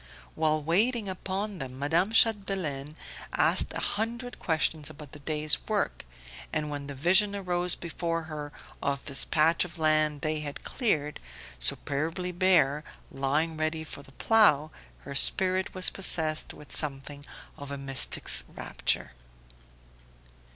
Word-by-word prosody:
While 155 -1 0
waiting 210 - +2
Upon 195 +2 -4
them 130 -2 -6
Madame 165 +8 +1
Chapdelaine 190 -11 +1 0.4
asked - - +2
a - - -3
hundred 235 +4 -3
questions 155 -2 0
about 150 -2 -12
the 150 - -11
day's 150 +1 0
work, - - -1 0.5
and 150 -1 -2
when 145 -1 -5
the 140 - -7
vision 190 +8 +4
arose 180 -2 +2
before 165 0 -3
her 150 -2 -7 0.3
of 140 0 -2
this 140 -2 0
patch 160 +2 +3
of 180 -1 -8
land 155 -2 +2
they 155 0 -1
had 145 -1 -7
cleared, 150 - -1 0.4
superbly 160 - -1
bare, 170 -5 +3 0.3
lying 150 +4 0
ready 155 0 -1
for 155 - -8
the 135 - -18
Plough, 155 -10 +4 0.3
her 140 - -8
spirit 185 +7 +2
was 185 - +3
possessed 160 -5 +2
with 150 - -14
something 145 -1 +1 0.3
of 145 -2 -9
a 140 - -4
mystic's 135 -1 +2
rapture. - - -2
155 Hz, 135 wpm, -28 LUFS, 145-185 Hz, 0.5 s, vision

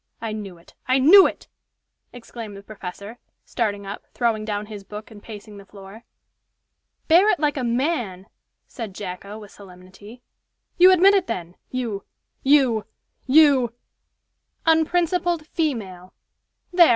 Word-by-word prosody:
I 225 -1 -4
knew 205 -4 -7
it! 170 - -21
I 255 +1 +3
knew 345 +9 +8
it!" - - -8 0.6
exclaimed 230 -3 -9
the 200 - -12
professor, 200 +2 -9 0.3
starting 205 -4 -2
up, 200 +1 -8
throwing 225 -3 0
down 210 -1 -3
his 210 -2 -9
book, 210 +3 -10
and 210 -2 -13
pacing 210 -1 -11
the 200 - -13
floor. 200 +3 -13 1.0
"Bear 355 +6 +6
it 365 - +2
like 295 -1 +1
a 265 - -3
man!" 235 - -1 0.4
said 220 -6 -8
Jacko, 200 +1 -7
with 210 -2 -12
solemnity. 195 +5 -15 0.6
"You 365 +1 +8
admit 375 +2 +6
it, 390 -3 +2
then. 175 -5 -5
You 230 -6 -4 0.4
you 265 -6 +3 0.4
you 270 -5 +5 0.4
" - - -51
"'Unprincipled 340 +1 +1
female.' 205 - -4 0.6
There! 350 -2 +7
225 Hz, 140 wpm, -23 LUFS, 200-290 Hz, 1.0 s, knew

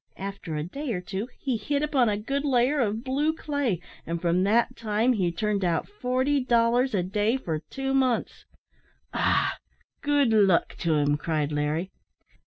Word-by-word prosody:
After 195 -4 -5
a 150 - -2
day 270 - -4
or 180 - -2
two 195 +4 -4
he 260 -4 -1
hit 280 +7 -1
upon 265 -6 +2
a 205 - 0
good 275 +7 -2
layer 270 +1 +2
of 220 -1 0
blue 285 +4 +1
clay, 285 - -1 0.2
and 170 +1 -3
from 175 +1 +1
that 215 +5 +2
time 225 +3 +1
he 185 -6 0
turned 205 +2 -1
out 170 -2 0
forty 265 -6 0
dollars 240 0 +2
a 180 - +1
day 210 +6 +1
for 165 -11 -3
two 270 0 -2
months." 260 -3 0 0.7
"Ah! - - +1 0.4
good 285 -5 +2
luck 195 -5 +4
to 165 -2 +1
him," 145 0 +2
cried 155 -1 -1
Larry. 150 +5 -1
220 Hz, 170 wpm, -26 LUFS, 180-265 Hz, 0.7 s, luck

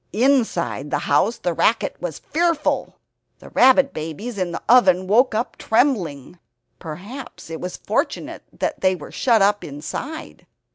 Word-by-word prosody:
Inside 220 - +1
the - - 0
house 185 +11 +2
the 175 - -2
racket 215 +4 +1
was 175 -4 -4
fearful. 335 -1 0 0.4
The - - -14
rabbit 265 +2 +5
babies 165 +9 -5
in 180 -2 -1
the 170 - -6
oven 190 -7 +5
woke 225 +4 +3
up 230 +3 -2
trembling; 180 - 0 0.4
perhaps 200 - -9
it 160 - -6
was 180 0 -5
fortunate - - -2 0.4
they 185 0 +2
were 150 - -10
shut 230 -5 +3
up 205 +1 +2
inside. 155 - -7
205 Hz, 140 wpm, -21 LUFS, 170-250 Hz, 0.4 s, rabbit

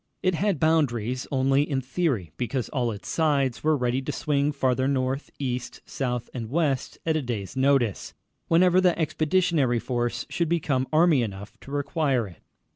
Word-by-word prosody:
It 185 - +2
had 190 -1 0
boundaries 130 -6 +1
only 135 0 +3
in 145 -2 -1
theory, 130 - -1
because 125 +1 -2
all 125 -4 -1
its 105 -2 -7
sides 140 -6 +1
were 155 -1 +3
ready 125 0 0
to 135 - -4
swing 145 0 0
farther 130 -2 +1
north, 135 0 -1
east, 125 -3 -4
south, 125 -3 -3
and 115 -3 -5
west 140 -3 0
at 160 -1 +1
a 155 - +1
day's 115 -6 -4
notice, 130 -5 +1 0.3
whenever 180 +2 +4
the 180 -2 +3
Expeditionary 155 -4 +1
Force 120 0 -2
should 170 -2 -1
become 140 -6 0
army 155 -3 +4
enough 100 -2 -6
to 135 - -12
require 140 -4 0
it. 85 - -15
135 Hz, 165 wpm, -25 LUFS, 125-155 Hz, 0.3 s, whenever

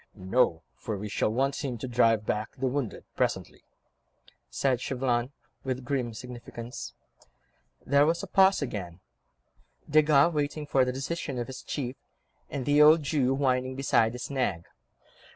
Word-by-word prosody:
"No, 95 -3 +1
for 100 - -5
we 105 +2 -5
shall 105 - 0
want 135 +5 0
him 130 -4 -3
to 120 - -5
drive 115 -3 +3
back 105 +1 -2
the 135 - -3
wounded 130 -3 -2
presently," - - -2 0.9
said 130 -3 0
Chauvelin, 125 -1 -1 0.3
with 130 -1 -3
grim 125 -4 -2
significance. 120 0 -8 0.9
There 140 +2 +4
was 170 +3 0
a - - -5
pause 190 -3 +4
again—Desgas, 140 - -1
waiting 150 0 -2
for 135 -2 +3
the 125 - 0
decision 135 +1 -4
of 120 - -2
his 130 +1 -8
chief, 130 -2 -4 0.5
and 135 -3 -4
the 145 +1 +4
old 155 +1 +7
Jew 135 -3 +1
whining 130 -1 0
beside 120 -4 +2
his 125 +2 -6
nag. 100 -11 -1
130 Hz, 145 wpm, -28 LUFS, 120-140 Hz, 0.9 s, old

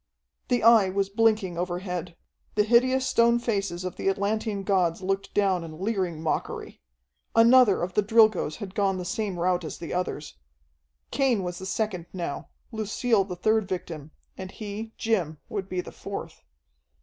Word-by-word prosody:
The 245 - +1
Eye 225 -4 +6
was 195 +1 0
blinking 215 -4 +1
overhead. 180 -1 -4 0.4
The 210 - +4
hideous 255 +4 +3
stone 235 -1 +4
faces 200 -7 -2
of 185 - -5
the - - 0
Atlantean 205 +1 -1
gods 185 -3 +1
looked 195 +1 -2
down 195 -4 +2
in 160 -1 -9
leering 185 -6 -2
mockery. 160 - -3 0.5
Another 230 -4 +6
of 180 +1 -3
the 210 - +3
Drilgoes 215 -6 +3
had 200 -4 -8
gone 195 -2 +1
the 180 - -5
same 200 -1 -2
route 180 0 +1
as 155 - -6
the 170 - -6
others. 175 -4 -4 0.7
Cain 250 -8 +1
was 180 0 -4
the 190 - -6
second 190 -5 -2
now, 170 -6 -5 0.2
Lucille 220 0 +1
the 180 -2 -6
third 215 +3 +1
victim, 165 -5 -5 0.3
and 190 -1 -7
he, 215 +2 -7
Jim, 180 -9 0
would 195 -2 -4
be 180 -1 -1
the - - -10
fourth. - - -7
195 Hz, 160 wpm, -26 LUFS, 180-220 Hz, 0.7 s, Eye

